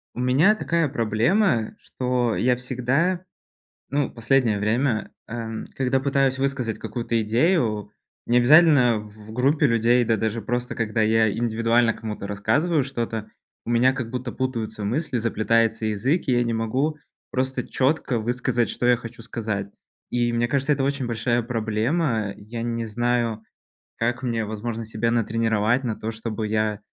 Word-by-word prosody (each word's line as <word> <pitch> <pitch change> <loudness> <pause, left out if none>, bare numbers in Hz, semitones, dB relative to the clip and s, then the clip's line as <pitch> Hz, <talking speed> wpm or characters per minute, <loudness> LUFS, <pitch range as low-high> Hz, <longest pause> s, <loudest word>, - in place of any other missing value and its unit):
У - - -6
меня 140 +12 +4
такая 165 -7 0
проблема, 115 - +1
что 125 -2 -1
я 125 0 +2
всегда, 130 +9 0 0.7
ну, 140 0 0
последнее 115 -2 +1
время, 115 +3 0 0.2
эм, 115 -1 -5
когда 135 0 +1
пытаюсь 135 -1 +1
высказать 135 -5 -1
какую-то 115 -2 -2
идею, 110 - +1 0.3
не 120 - +3
обязательно 130 -2 +6
в 105 0 -13
в - - -7
группе 140 +6 +2
людей, 120 +1 +3
да, 115 -1 +1
даже 110 +2 -2
просто 120 +3 -3
когда 110 0 -1
я 110 0 +3
индивидуально 115 +1 +2
кому-то 105 -3 -6
рассказываю 130 - +1
что-то, 115 -4 -4 0.4
у - - -6
меня, 120 +2 +4
как 130 -4 -4
будто, 125 0 -4
путаются 115 -5 -3
мысли, 130 +6 -1
заплетается 115 0 +1
язык, 110 - 0
и 130 - +3
я 120 0 +3
не 115 -1 -1
могу 130 +8 -1 0.3
просто 130 +1 -1
чётко 135 -3 0
высказать, 120 +1 0
что - - -3
я 125 -1 +5
хочу 115 0 -10
сказать. 110 -3 -3 0.4
И, 120 -1 +1
мне 120 0 +1
кажется, 140 +3 +1
это 140 -1 -1
очень 140 -2 -1
большая 120 +1 0
проблема. 115 0 -1
Я 115 +3 -7
не 115 0 -2
знаю, 115 0 -1 0.5
как 120 +2 -1
мне, 115 -3 -1
возможно, 110 +2 -4
себя 110 +1 -1
натренировать 115 +1 +1
на 115 -4 -2
то, 110 - -4
чтобы 110 -1 -4
я, 110 -1 0
120 Hz, 155 wpm, -24 LUFS, 110-130 Hz, 0.7 s, обязательно